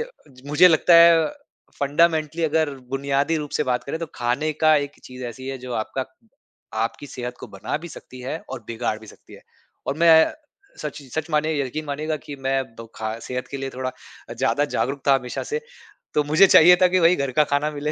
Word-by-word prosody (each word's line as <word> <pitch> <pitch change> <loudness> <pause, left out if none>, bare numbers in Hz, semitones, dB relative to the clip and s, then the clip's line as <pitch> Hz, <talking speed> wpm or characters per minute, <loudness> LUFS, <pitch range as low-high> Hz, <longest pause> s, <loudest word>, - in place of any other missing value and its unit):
अ, 465 - -3 0.2
ज 130 -2 -19
मुझे 170 +5 +6
लगता 165 +1 +4
है 170 -1 +7 0.6
फंडामेंटली 160 +2 +1
अगर 160 -1 +1 0.2
बुनियादी 140 +3 0
रूप 150 -2 -5
से - - +2
बात 125 0 -1
करें 140 +5 -4
तो 165 - -3
खाने 125 +6 -1
का 155 0 +6
एक 145 -1 -3
चीज़ 125 0 -9
ऐसी 130 +2 -8
है 135 - -4
जो 125 0 -8
आपका 130 +4 -3 0.8
आपकी 130 +5 -6
सेहत 125 -1 -6
को - - -7
बना - - -4
भी - - -6
सकती 130 -5 -12
है 130 +5 -4
और 130 -4 -7
बिगाड़ 115 -2 -2
भी 110 - -13
सकती - - -15
है - - -15 0.4
और 140 - -2
मैं 170 0 +6 0.7
सच 150 -1 -6
इ 135 - -16
सच 155 +5 -4
मानिए 155 +1 +1
य - - -2
यकीन 155 +5 -5
मानिएगा 155 +2 -3
कि 145 - -6
मैं 135 0 +2 0.2
वो 115 - -8
खा 110 +1 -4
सेहत 125 +2 -5
के 140 - -4
लिए 135 0 -4
थोड़ा 130 0 -3 0.4
अ, - - -6
ज़्यादा 130 +4 +1
जागरूक 135 +2 -1
था 140 - +7
हमेशा 125 -2 -3
से। 455 - 0 0.6
तो 150 - +3
मुझे 155 +7 +5
चाहिए 180 0 +8
था 185 - +7
कि 185 +1 +2
वही 170 +1 +5
घर 140 -4 -2
का 150 - +7
खाना 150 +2 +1
मिले 150 0 -3
145 Hz, 220 wpm, -23 LUFS, 130-155 Hz, 0.8 s, चाहिए